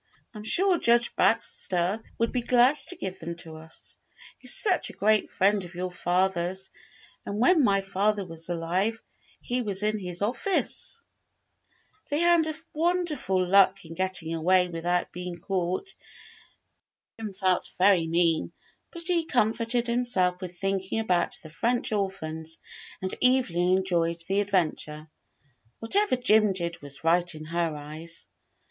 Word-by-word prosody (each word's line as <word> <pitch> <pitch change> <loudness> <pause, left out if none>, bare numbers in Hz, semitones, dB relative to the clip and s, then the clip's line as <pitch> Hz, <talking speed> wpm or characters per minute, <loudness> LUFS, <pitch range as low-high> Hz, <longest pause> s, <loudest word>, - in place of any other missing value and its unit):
I'm 210 -1 -9
sure 360 - +4
Judge 235 0 +3
Baxter 180 +4 +1 0.2
would 230 0 0
be 250 - -1
glad 250 +3 +4
to 365 - +1
give 190 - -6
them 170 0 -6
to 160 -2 -7
us. 160 +1 -9 0.4
He's - - -1
such 380 -6 +3
a - - -10
great 215 0 +2
friend 200 +1 +2
of 175 0 -10
your 180 +1 -3
father's, 185 +1 -1 0.5
and 200 - -5
when 295 +7 +4
my 195 -4 +3
father 195 +1 0
was 165 -1 -2
alive 180 +6 -1 0.4
he 250 +1 -1
was 205 -3 +1
in 215 0 0
his 180 0 -2
office." 385 - -1 1.1
They 290 - 0
had 340 -1 +4 0.3
wonderful 310 - 0
luck 195 0 +4
in 165 - -9
getting 185 -2 0
away 180 +2 +2
without 175 +1 -1
being 180 0 -6
caught. 185 - -2 1.3
Jim 220 -2 -5
felt 185 -1 0
very 185 -3 +4
mean, 165 -1 +1 0.4
but 340 -1 -9
he 335 -1 +1
comforted 235 -2 +2
himself 235 -7 +1
with 180 -1 -7
thinking 195 +1 -2
about 180 -6 0
the 155 - -11
French 235 +9 -1
orphans, 165 -6 -3 0.5
and 185 - -2
Evelyn 185 -9 +3
enjoyed 170 -3 -1
the 195 +1 +1
adventure. 160 -6 -2 0.7
Whatever 400 - +1
Jim 215 -5 +3
did 170 -2 -3
was 145 +1 -9
right 175 +1 +2
in 155 0 -9
her 170 -1 -1
eyes. 155 +3 -7
190 Hz, 140 wpm, -27 LUFS, 170-225 Hz, 1.3 s, sure